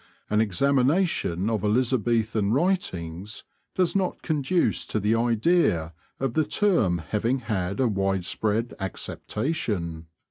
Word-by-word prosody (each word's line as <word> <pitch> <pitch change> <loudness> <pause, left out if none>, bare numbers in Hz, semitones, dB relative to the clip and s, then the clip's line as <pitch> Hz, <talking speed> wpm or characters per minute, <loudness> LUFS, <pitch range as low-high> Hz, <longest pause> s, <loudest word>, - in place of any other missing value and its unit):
An 105 +1 +4
examination 130 - +1
of 110 -4 -1
Elizabethan 110 -2 +1
writings 105 - -1 0.3
does 185 0 +1
not 190 -2 -1
conduce 155 +2 +1
to 110 - -1
the 105 +2 +1
idea 115 - +2 0.3
of 135 -3 -1
the 155 - +2
term 160 - +2
having 115 +5 +1
had 100 -4 -2
a 130 - +3
widespread 100 +3 -1
acceptation. 95 - -3
110 Hz, 110 wpm, -25 LUFS, 95-140 Hz, 0.3 s, An